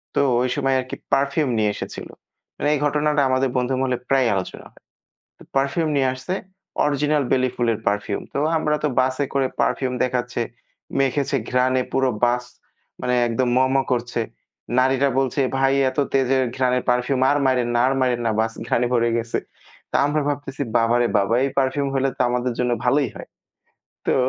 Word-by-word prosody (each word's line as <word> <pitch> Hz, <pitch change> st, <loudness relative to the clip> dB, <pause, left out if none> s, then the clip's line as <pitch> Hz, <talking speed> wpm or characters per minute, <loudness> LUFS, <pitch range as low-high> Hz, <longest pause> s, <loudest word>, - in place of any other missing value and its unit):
তো -, -, +3 dB, 0.2 s
ঐ -, -, +1 dB
সময় 135 Hz, -2 st, +1 dB
আরকি 130 Hz, 0 st, -5 dB, 0.2 s
পারফিউম 140 Hz, +1 st, +2 dB
নিয়ে 105 Hz, -1 st, +2 dB
এসেছিল। -, -, -7 dB, 0.5 s
মানে 145 Hz, -, 0 dB
এই 145 Hz, -, 0 dB
ঘটনাটা 150 Hz, 0 st, +1 dB
আমাদের 130 Hz, 0 st, +2 dB
বন্ধু 125 Hz, +1 st, 0 dB
মহলে 125 Hz, -2 st, 0 dB
প্রায়ই 130 Hz, -3 st, +3 dB
আলোচনা 95 Hz, -2 st, -5 dB
হয়। -, -, -23 dB, 0.8 s
পারফিউম 140 Hz, +4 st, +1 dB
নিয়ে 135 Hz, -2 st, +2 dB
আসছে 130 Hz, +9 st, -4 dB, 0.5 s
অরিজিনাল 150 Hz, +1 st, +1 dB
বেলি 130 Hz, 0 st, +3 dB
ফুলের 115 Hz, -3 st, +1 dB
পারফিউম। 100 Hz, 0 st, -1 dB
তো -, -, -3 dB, 0.2 s
আমরা 150 Hz, -1 st, +1 dB
তো -, -, +3 dB
বাসে 130 Hz, +2 st, 0 dB
করে 135 Hz, -1 st, +2 dB
পারফিউম 130 Hz, -2 st, 0 dB
দেখাচ্ছে, 125 Hz, -1 st, -2 dB, 0.6 s
মেখেছে 135 Hz, +1 st, +1 dB
ঘ্রাণ 125 Hz, +1 st, +2 dB, 0.2 s
পুরো 135 Hz, -1 st, +2 dB
বাস 120 Hz, +1 st, +1 dB, 0.6 s
মানে 125 Hz, 0 st, 0 dB
একদম 120 Hz, +2 st, 0 dB
ম, -, -, +6 dB, 0.2 s
ম -, -, +4 dB, 0.2 s
করছে। 120 Hz, -1 st, -1 dB, 0.6 s
নারীরা 130 Hz, +2 st, +3 dB
বলছে 135 Hz, +1 st, 0 dB, 0.2 s
ভাই 135 Hz, 0 st, +3 dB, 0.2 s
এত 130 Hz, -, -14 dB
তেজের 135 Hz, -1 st, +2 dB
ঘ্রাণের 125 Hz, -1 st, +1 dB
পারফিউম 125 Hz, +2 st, +1 dB
আর 145 Hz, -, +3 dB
মাইরেন 125 Hz, -2 st, +2 dB
না -, -, +3 dB
আর 130 Hz, -, +2 dB
মাইরেন 125 Hz, -2 st, +1 dB
না -, -, +2 dB
বাস 110 Hz, 0 st, 0 dB
ঘ্রাণে 125 Hz, -1 st, +1 dB
ভরে 120 Hz, -1 st, +2 dB
গেছে। 115 Hz, 0 st, -2 dB, 0.5 s
তো -, -, +3 dB
আমরা 150 Hz, +1 st, 0 dB
ভাবতেছি 145 Hz, -1 st, -3 dB
বাবারে 120 Hz, +1 st, +3 dB
বাবা 100 Hz, +3 st, +1 dB
এই 140 Hz, -, 0 dB
পারফিউম 135 Hz, +1 st, +1 dB
হলে 135 Hz, 0 st, +1 dB
তো -, -, +1 dB
আমাদের 125 Hz, 0 st, -1 dB
জন্য 125 Hz, -1 st, +1 dB
ভালোই 135 Hz, +2 st, +2 dB
হয়। -, -, -10 dB, 0.8 s
তো -, -, +2 dB
130 Hz, 175 wpm, -22 LUFS, 125-140 Hz, 0.8 s, ম